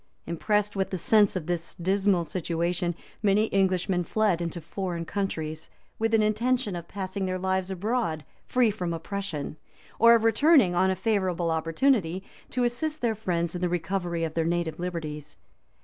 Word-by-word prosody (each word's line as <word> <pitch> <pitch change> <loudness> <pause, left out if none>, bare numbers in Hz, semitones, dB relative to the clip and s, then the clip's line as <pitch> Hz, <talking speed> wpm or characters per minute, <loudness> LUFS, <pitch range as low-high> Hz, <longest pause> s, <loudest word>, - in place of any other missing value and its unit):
Impressed 210 +5 0
with 190 -1 0
the 190 - -2
sense 205 +3 +4
of 180 -4 -3
this 170 -1 -3
dismal 190 0 +1
situation, 175 0 -1 0.3
many 210 +1 +2
Englishmen 185 -1 +2
fled 200 -1 +1
into 170 0 -3
foreign 170 +1 -4
countries, 160 -5 -3 0.3
with 225 0 +2
an 220 - +4
intention 215 0 +1
of 170 -1 -6
passing 190 0 -3
their 185 0 -1
lives 190 0 -1
abroad 190 -4 -1 0.2
free 245 -3 +3
from 180 -5 -3
oppression, 165 -4 -5 0.4
or 235 +1 +8
of 225 - +1
returning, 225 - +5
on 185 +2 +3
a 190 - +1
favorable 185 -4 0
opportunity, 170 - +1 0.3
to 250 - 0
assist 300 +6 -1
their 235 -2 +2
friends 170 -6 -1
in 180 - -4
the 180 - +1
recovery 175 -1 -2
of 160 -1 -2
their 165 - +1
native 170 -1 -1
liberties. 155 -4 -5
185 Hz, 165 wpm, -27 LUFS, 170-210 Hz, 0.4 s, or